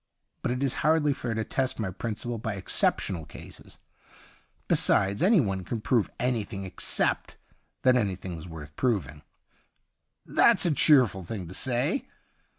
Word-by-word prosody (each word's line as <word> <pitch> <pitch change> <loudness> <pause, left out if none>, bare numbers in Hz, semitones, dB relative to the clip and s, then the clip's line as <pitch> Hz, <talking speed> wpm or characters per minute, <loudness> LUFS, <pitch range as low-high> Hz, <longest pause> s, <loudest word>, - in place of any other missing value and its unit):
But - - -2
it 125 +2 -2
is 135 - 0
hardly 150 -1 +3
fair 120 -4 -4
to 110 - -1
test 130 +4 -2
my 105 -4 -3
principle 115 +4 -4
by 110 -2 -3
exceptional 90 -2 +1
cases. - - -12 0.9
Besides, 100 +1 +3
any 200 +1 +5
one 95 - -1
can 115 +5 -4
prove 110 0 +1
anything 115 -5 -2
except 95 - 0 0.5
that 130 -1 +5
anything' 95 -6 -2
s 80 +1 -9
worth 75 -3 -10
proving.' 85 - -1 0.6
' - - -53 0.2
That's - - +4
a 170 - +2
cheerful 125 -9 +4
thing 95 -1 -6
to - - -8
say. 130 - -1
110 Hz, 150 wpm, -27 LUFS, 95-130 Hz, 0.9 s, any